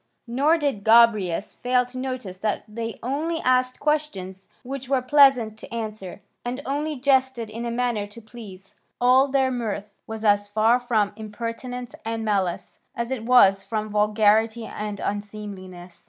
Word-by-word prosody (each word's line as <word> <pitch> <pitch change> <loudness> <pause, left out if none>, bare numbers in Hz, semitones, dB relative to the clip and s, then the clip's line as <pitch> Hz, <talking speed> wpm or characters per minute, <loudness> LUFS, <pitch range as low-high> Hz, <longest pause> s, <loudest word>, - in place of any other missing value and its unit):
Nor 280 +8 +2
did 280 -10 -2
Gobryas 215 -5 +4
fail 250 0 +1
to 250 +1 -11
notice 255 -8 -5
that 215 +1 -1
they 225 +1 -5
only 310 +6 -2
asked 255 0 +1
questions 240 -12 -2 0.2
which 265 0 -6
were 270 -2 +3
pleasant 255 -5 +4
to - - -11
answer, 215 -5 -6 0.2
and 245 +2 -4
only 295 +3 -2
jested 260 -4 +1
in 230 +2 -5
a - - -2
manner 235 -3 -1
to 205 +3 -12
please; 210 -4 -12 0.3
all 255 +2 +5
their 265 -1 +1
mirth 210 -4 -4
was 220 0 -6
as 205 -1 +3
far 220 +4 +3
from 220 -5 0
impertinence 230 +3 -6
and 225 0 -3
malice 195 -5 -2 0.2
as 235 +1 -3
it 235 -4 -3
was 195 -6 +5
from 215 -1 -3
vulgarity 215 +2 +2
and 210 -2 -5
unseemliness. 200 -4 -6
230 Hz, 155 wpm, -24 LUFS, 210-255 Hz, 0.3 s, all